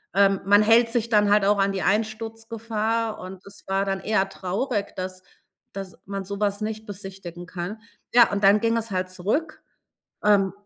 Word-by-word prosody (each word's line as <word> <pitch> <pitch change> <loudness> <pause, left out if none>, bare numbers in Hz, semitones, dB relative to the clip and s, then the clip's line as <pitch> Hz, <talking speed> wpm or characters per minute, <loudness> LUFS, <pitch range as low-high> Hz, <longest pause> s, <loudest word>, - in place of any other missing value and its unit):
ähm, 195 -1 +4
man 205 +1 +6
hält 230 +2 +5
sich 235 -1 -1
dann 210 -2 +4
halt 205 -1 +4
auch 205 0 +3
an 195 0 +2
die 190 - -2
Einsturzgefahr 225 +1 -2
und 185 +1 -10
es 200 0 -14
war 195 +1 0
dann 195 -1 -1
eher 195 -1 +1
traurig, 205 +4 -3
dass 185 0 -5 0.5
dass 195 -1 -7
man 195 0 -4
so 200 +1 -6
was 205 0 0
nicht 220 0 -4
besichtigen 190 -3 -8
kann. 185 +4 -6 0.3
Ja, 240 -1 +6
und 200 0 -2
dann 205 +2 +6
ging 230 0 +2
es 225 -1 -4
halt 185 -1 -1
zurück, 215 - -2 0.6
ähm 200 -3 +4
205 Hz, 180 wpm, -24 LUFS, 195-220 Hz, 0.6 s, man